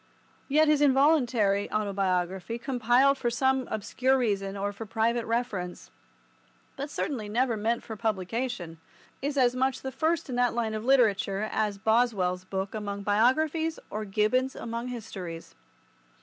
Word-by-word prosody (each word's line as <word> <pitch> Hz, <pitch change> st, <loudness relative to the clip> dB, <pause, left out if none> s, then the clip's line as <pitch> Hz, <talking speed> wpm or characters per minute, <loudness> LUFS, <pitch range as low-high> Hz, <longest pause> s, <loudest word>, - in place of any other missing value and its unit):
Yet 310 Hz, +3 st, +4 dB
his 300 Hz, -1 st, +3 dB
involuntary 260 Hz, -8 st, +3 dB
autobiography, 190 Hz, -1 st, -1 dB
compiled 250 Hz, +2 st, +2 dB
for 240 Hz, -, 0 dB
some 265 Hz, +2 st, +1 dB
obscure 260 Hz, +5 st, +1 dB
reason 200 Hz, -5 st, -1 dB
or 200 Hz, +1 st, -2 dB
for 220 Hz, +2 st, -8 dB
private 230 Hz, +2 st, 0 dB
reference, 220 Hz, -7 st, -3 dB, 0.8 s
but 280 Hz, +2 st, -5 dB
certainly 240 Hz, -8 st, -3 dB
never 240 Hz, +2 st, +1 dB
meant 225 Hz, +2 st, -1 dB
for 220 Hz, -, -7 dB
publication, 215 Hz, -4 st, -3 dB, 0.4 s
is 285 Hz, +1 st, -2 dB
as 250 Hz, -2 st, +3 dB
much 260 Hz, +1 st, 0 dB
the 265 Hz, -, -3 dB
first 315 Hz, +5 st, 0 dB
in 255 Hz, -, -4 dB
that 245 Hz, -1 st, +2 dB
line 225 Hz, -2 st, -1 dB
of 215 Hz, 0 st, -4 dB
literature 215 Hz, -5 st, +2 dB
as 210 Hz, -2 st, 0 dB
Boswell's 205 Hz, -5 st, +1 dB
book 190 Hz, +1 st, -3 dB
among 200 Hz, -2 st, -4 dB
biographies 305 Hz, +10 st, +2 dB
or 215 Hz, +1 st, -3 dB
Gibbon's 215 Hz, +6 st, +1 dB
among 230 Hz, +1 st, -5 dB
histories. 190 Hz, -9 st, -7 dB
230 Hz, 140 wpm, -28 LUFS, 200-260 Hz, 0.8 s, Yet